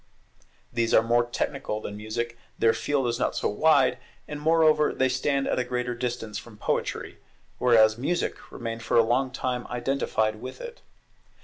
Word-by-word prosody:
These 115 -1 +2
are 110 - +6
more 120 +1 +2
technical 105 -2 -3
than 105 -1 -6
Music; 115 +3 -4 0.2
their 115 -1 +4
field 145 -3 0
is 120 +1 -1
not - - 0
so - - 0
wide, 140 +4 +3 0.3
and 150 0 -6
moreover 155 -1 +4
they 130 - +2
stand 135 +2 0
at - - 0
a - - +1
greater 125 0 -2
distance 120 -3 -4
from 115 -3 -13
poetry; - - -3 0.4
whereas 110 -2 +5
Music 170 +7 -2
remained 115 -1 -5
for 115 - +1
a 115 - +7
long 130 +3 +1
time 125 -1 -3
identified 120 -4 -1
with 130 +4 -8
it. 475 0 -9
120 Hz, 170 wpm, -26 LUFS, 115-135 Hz, 0.4 s, a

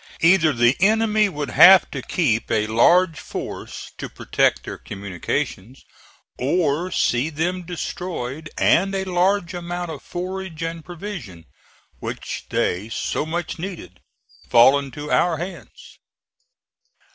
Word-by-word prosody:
Either 165 -2 +5
the 120 0 +3
enemy 215 +1 +3
would 145 -7 -5
have 190 +6 +8
to - - -4
keep 120 -10 0
a 105 -1 +1
large 160 +9 +3
force - - -7
to - - -5
protect - - 0
their - - -7
communications, 100 +4 -5 0.6
or 155 +4 0
see 130 -4 +1
them 175 +4 -2
destroyed 165 -4 -5
and 195 +3 +3
a 190 - -1
large 185 0 +1
amount 175 -1 -4
of 150 - -8
forage 180 -2 -5
and 165 0 -4
provision, 160 - -8 0.5
which - - -6
they 100 +5 -1
so 150 - -2
much 170 0 -4
needed, 165 - -7 0.5
fall 130 +4 +6
into 140 +2 -7
our 170 -2 +2
hands. 175 +4 -9
165 Hz, 125 wpm, -22 LUFS, 130-180 Hz, 0.6 s, have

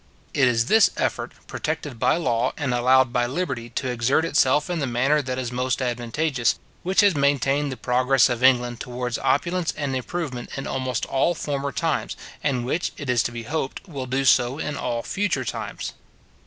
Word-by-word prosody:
It 135 -3 +4
is 115 -1 +2
this 220 - +5
effort, - - -1
protected 150 -5 -4
by - - +3
law, 125 -6 0
and 135 -4 -1
allowed 130 +1 +4
by 120 0 +2
liberty 130 -5 -3
to 130 +2 -3
exert 125 +6 +1
itself 145 -2 +3
in 175 -2 -2
the 140 - -1
manner 130 +5 +2
that 130 -2 -4
is 125 -2 -3
most 125 0 -1
advantageous, 120 +1 0 0.2
which 190 +4 +3
has 205 -2 +5
maintained 140 0 +1
the 130 - -5
progress 125 +2 +3
of 120 -1 -2
England 125 -2 +3
towards 125 0 -3
opulence 170 +4 +1
and 140 -3 -2
improvement 130 -2 -4
in 135 - -4
almost 130 -1 -2
all 155 +6 +1
former 140 -2 -3
times, 160 -1 -1 0.3
and 130 -4 0
which, 160 +7 -1
it 145 -4 -2
is 120 - +3
to - - -2
be 120 -1 -6
hoped, 145 - -4
will 140 -6 -5
do 135 +2 0
so 125 0 +4
in 150 -2 -3
all 120 -4 -2
future 190 -10 -1
times. - - -5
130 Hz, 185 wpm, -24 LUFS, 125-145 Hz, 0.3 s, this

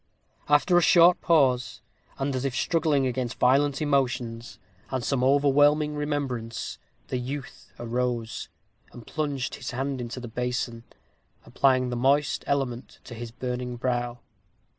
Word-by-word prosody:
After 150 +4 +5
a - - +1
short 175 +1 +6
pause, 130 -6 +2 0.3
and 135 0 -1
as 130 - -2
if 135 -2 -2
struggling 155 -3 +1
against 125 -1 -2
violent 140 +3 +3
emotions, 125 -5 -1 0.3
and 130 -2 -2
some 130 -1 0
overwhelming 145 +2 +4
remembrance, 140 -6 -3 0.3
the 125 - -1
youth 135 +2 -7
arose, 120 -1 -3 0.4
and 120 -2 -11
plunged 145 -4 -3
his - - -4
hand 135 +1 -3
into 120 +1 -5
the 120 - -7
basin, 120 0 -3 0.6
applying 130 -2 +2
the 125 - -3
moist 140 +4 +2
element 130 -4 -2
to - - -10
his 120 0 -7
burning 125 +1 -4
brow. 120 -1 -2
130 Hz, 135 wpm, -26 LUFS, 120-145 Hz, 0.6 s, short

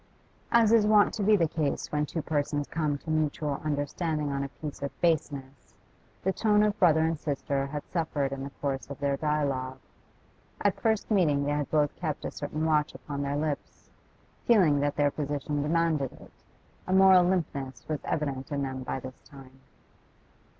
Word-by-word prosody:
As 230 -2 +5
is 225 -2 +5
wont 210 -1 +5
to 220 - -3
be 210 +2 +5
the 165 -3 +2
case 150 -2 -2
when 150 0 0
two 160 +1 -4
persons 145 -1 -1
come 150 -3 -1
to 160 +3 -6
mutual 150 -2 -1
understanding 150 +1 -1
on 140 0 -1
a 140 - -4
piece 145 0 -8
of 140 - -5
baseness, 140 -5 -1 0.5
the 190 - +1
tone 210 0 +3
of 210 0 0
brother 160 -4 +5
and 160 -1 0
sister 140 -2 -2
had 145 +1 -5
suffered 155 -5 -1
in 135 0 -4
the 140 - -5
course 140 -1 -4
of 140 - -6
their 140 -1 +1
dialogue. 140 -4 -1 0.8
At 200 -1 0
first 220 0 0
meeting 155 -9 +3
they 145 - -1
had 145 -1 -1
both 150 -2 +1
kept 155 -4 -3
a - - -3
certain 155 +2 -3
watch 150 -2 +1
upon 140 -1 -5
their 140 0 -1
lips, 150 -1 -4 0.6
feeling 180 -11 +5
that 145 0 0
their 145 -1 +2
position 145 0 -2
demanded 155 -3 +1
it; - - -15 0.6
a 185 - 0
moral 190 -1 +7
limpness 140 -8 -2
was 155 -2 -2
evident 140 -2 -3
in 140 -1 -1
them 130 -1 -4
by 130 - -3
this 130 0 -9
time. 135 -2 -15
150 Hz, 180 wpm, -28 LUFS, 140-165 Hz, 0.8 s, moral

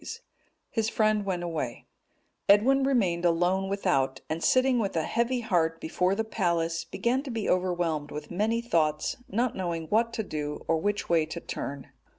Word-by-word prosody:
His 225 -2 0
friend 215 -2 +2
went 180 -2 -1
away; 155 -8 -4 0.6
Edwin 260 +7 +5
remained 200 -11 +1
alone 180 +3 +2
without, 135 -9 0
and 160 +1 -2
sitting 255 -1 +4
with 200 -5 -1
a 160 - +1
heavy 235 +6 0
heart 165 -7 +1
before 180 +4 0
the 225 - 0
palace, 170 -6 0
began 250 +3 0
to 280 - -8
be 230 -4 -3
overwhelmed 175 -5 0
with 150 0 -7
many 220 +6 0
thoughts, 155 -9 0
not 235 +4 0
knowing 170 -3 -3
what 230 +2 +2
to 220 - -2
do, 150 -5 -5
or 165 - +3
which 205 +4 -1
way 165 -2 +2
to 165 +2 -5
turn. 140 -4 -6
185 Hz, 165 wpm, -28 LUFS, 165-225 Hz, 0.6 s, Edwin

